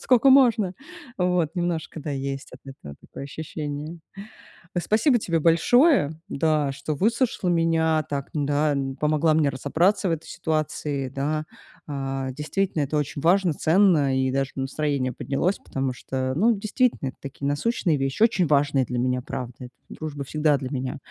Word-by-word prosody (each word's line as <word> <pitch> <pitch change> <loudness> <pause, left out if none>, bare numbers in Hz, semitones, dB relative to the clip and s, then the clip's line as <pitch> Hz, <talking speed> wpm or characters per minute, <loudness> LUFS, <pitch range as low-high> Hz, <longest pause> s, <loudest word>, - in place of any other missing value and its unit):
Скока 255 +1 +4
можно?" 235 -8 +5 0.4
Вот. 180 -3 +1
Немножко, 175 -3 -3
да, 150 +1 -5
есть 135 0 -4
от - - -12
этого 135 - -10
такое - - -10
ощущение. 150 +2 -6 0.8
Э. - - +2
Спасибо 235 - +3
тебе 170 -5 0
большое, 170 - +4
да, 150 -3 +1
что 145 +2 -4
выслушала 225 - +1
меня, 165 -2 +2
так, 140 -1 -3
да, 145 0 +1
м, 135 -1 -3
помогла 155 +2 +2
мне 155 -1 +3
разобраться 170 +9 +1
в - - +1
этой 165 -1 -3
ситуации. 155 -4 -2
Да. 145 +4 -2 0.4
А, 135 -2 -3
действительно, 155 +4 -2
это 145 +2 -1
очень 145 -1 -3
важно, 180 +1 +3
ценно, 155 -5 +3
и 130 0 +1
даже 135 0 -1
настроение 135 -1 -1
поднялось, 165 +11 -1
потому 135 -1 -3
что, 130 +1 -3
ну, 215 +10 +4
действительно 215 - 0
это - - -13
такие 140 0 -5
насущные 160 +3 0
вещи, 135 +9 0
очень 195 -7 +3
важные 145 -2 +3
для 125 +1 -4
меня, 125 0 0
правда. 125 0 -7 0.2
Дружба 145 -3 -6
всегда 150 +1 +2
для 130 -2 -5
меня 130 -2 -3
150 Hz, 155 wpm, -24 LUFS, 135-175 Hz, 0.8 s, можно